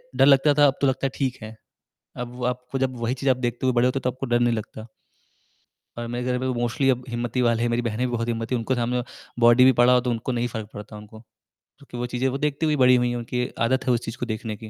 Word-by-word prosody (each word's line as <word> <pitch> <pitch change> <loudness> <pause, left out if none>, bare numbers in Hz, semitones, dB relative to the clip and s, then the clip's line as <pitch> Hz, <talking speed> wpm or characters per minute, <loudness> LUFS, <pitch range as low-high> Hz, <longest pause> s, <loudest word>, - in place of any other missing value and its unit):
डर - - +5
लगता 140 +1 +5
था 145 - +7
अब 135 - +1
तो 140 - +3
लगता 135 +1 -1
है - - -6
ठीक 130 -3 -2
है। 110 +1 -9 0.6
अब 125 0 -6
आपको 125 +2 -3
जब 130 -1 -1
वही 120 +2 -1
चीज़ 135 +1 0
आप 125 - +3
देखते 120 +2 -4
हुए 130 - +2
बड़े 120 +1 +3
होते 130 +1 +1
है - - -11
तो 125 - +1
आपको 130 +2 -6
डर 120 0 +1
नहीं 120 -1 +2
लगता। 110 +1 -7 1.1
और 120 - -4
मेरे 120 +1 -4
घर 125 0 0
में 130 +1 -2
तो - - -4
मोस्टली 120 +3 0 0.2
हिम्मती 120 +1 -2
वाले 115 -1 +2
है, 120 - +1
मेरी 120 +1 0
बहने 115 +2 -1
भी 120 - -5
बहुत 115 0 -2
हिम्मती 115 +1 -2
है, - - +1
उनके 125 +3 -1
सामने 120 +1 -1 0.4
बॉडी 120 +2 +6
भी 130 - +7
पड़ा 125 +1 +6
हो 125 - +5
तो 125 0 -2
उनको 115 +2 -2
नहीं 120 0 -1
फ़र्क 110 -2 -6
पड़ता 105 +1 -9
उनको। 105 +1 -12 0.6
क्योंकि 135 -3 -11
वो 120 - -2
चीज़ें 125 +2 0
वो 135 - -3
देखती 150 +2 -1
हुई 150 -1 +2
बड़ी 125 -2 +5
हुई 125 0 +1
है, 120 - -2
उनकी 125 +1 -2 0.2
आदत 130 +2 +1
है - - +4
उस 120 - +1
चीज़ 115 +2 -6
को 125 - -3
देखने 110 -1 -4
की। 110 0 -10
125 Hz, 280 wpm, -24 LUFS, 120-130 Hz, 1.1 s, था